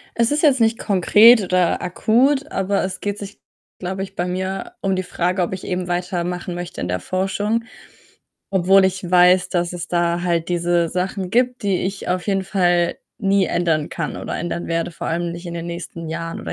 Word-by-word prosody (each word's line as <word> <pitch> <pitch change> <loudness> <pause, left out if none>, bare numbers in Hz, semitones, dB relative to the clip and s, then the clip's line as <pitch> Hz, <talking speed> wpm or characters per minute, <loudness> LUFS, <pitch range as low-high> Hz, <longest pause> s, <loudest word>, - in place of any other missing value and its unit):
Es 235 +3 +2
ist 300 +2 0
jetzt 275 -4 +5
nicht 225 0 +3
konkret 210 +4 +6
oder 180 -2 +1
akut, 265 - +1
aber 195 +1 0
es 185 0 -4
geht 205 0 -3
sich, 200 0 -9 0.4
glaube 190 +1 -3
ich, 195 - -9
bei 175 - -1
mir 190 - -4
um 195 -1 0
die 185 - -1
Frage, 180 +1 -1
ob 175 +1 -1
ich 185 - -6
eben 180 -1 -2
weitermachen 180 0 -2
möchte 175 +1 -6
in 90 - -3
der 90 0 -1
Forschung, 205 - -1 0.9
obwohl 190 0 +4
ich 185 -1 -3
weiß, 180 +1 +5
dass 175 -1 0
es 175 -1 -5
da 170 0 0
halt 170 -2 0
diese 175 -1 +1
Sachen 185 +1 -3
gibt, 250 +2 +1
die 195 -3 +1
ich 195 +1 -4
auf 180 +2 -1
jeden 195 -1 0
Fall 175 -3 +1 0.2
nie 195 -1 +2
ändern 165 -4 0
kann 165 -3 -4
oder - - -5
ändern 170 0 -4
werde, 165 +1 -1
vor - - -6
allem 170 +1 -1
nicht 170 +1 -8
in 170 - -6
den 170 0 -5
nächsten 170 -1 -6
Jahren 165 +1 -5
oder 80 -1 -5
180 Hz, 200 wpm, -21 LUFS, 175-195 Hz, 0.9 s, konkret